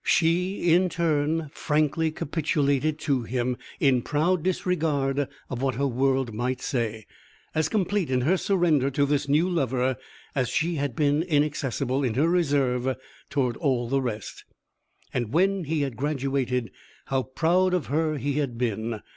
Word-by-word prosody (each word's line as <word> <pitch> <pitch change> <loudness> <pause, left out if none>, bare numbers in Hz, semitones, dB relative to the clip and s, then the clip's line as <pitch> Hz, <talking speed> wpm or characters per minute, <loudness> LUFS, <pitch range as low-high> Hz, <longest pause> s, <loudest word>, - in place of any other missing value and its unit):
She, 175 +2 +2
in 180 +1 +4
turn, 155 -2 0
frankly 155 +1 +1
capitulated 150 -1 0
to 140 -4 +1
him, 125 +1 -1 0.2
in 130 -3 +3
proud 160 +7 +1
disregard 150 -6 0 0.2
of 125 -1 -5
what 135 -3 0
her 140 +3 0
world 130 -1 +1
might 125 +4 -2
say, 115 -4 -2 0.5
as 155 0 +1
complete 200 -4 0
in 130 -1 +1
her 160 +9 +3
surrender 175 -8 +2
to 140 +1 +1
this 145 0 0
new 155 +5 +3
lover 130 -7 0 0.4
as 130 -3 0
she 165 +5 0
had 140 -4 -2
been 145 +1 +2
inaccessible 145 -4 0
in 120 -4 0
her 150 +5 +3
reserve 135 -7 +1 0.3
toward 130 -4 0
all 130 -6 0
the 135 +1 +1
rest. 110 -5 -5 0.7
And 120 -4 -2
when 190 +2 +2
he 155 +1 0
had 135 -5 -3
graduated, 135 -5 -1 0.3
how 135 -1 0
proud 175 +8 +2
of 175 - -1
her 155 +1 0
he 140 +2 -1
had 130 -5 -2
been! 115 -2 -2
140 Hz, 155 wpm, -26 LUFS, 130-160 Hz, 0.7 s, in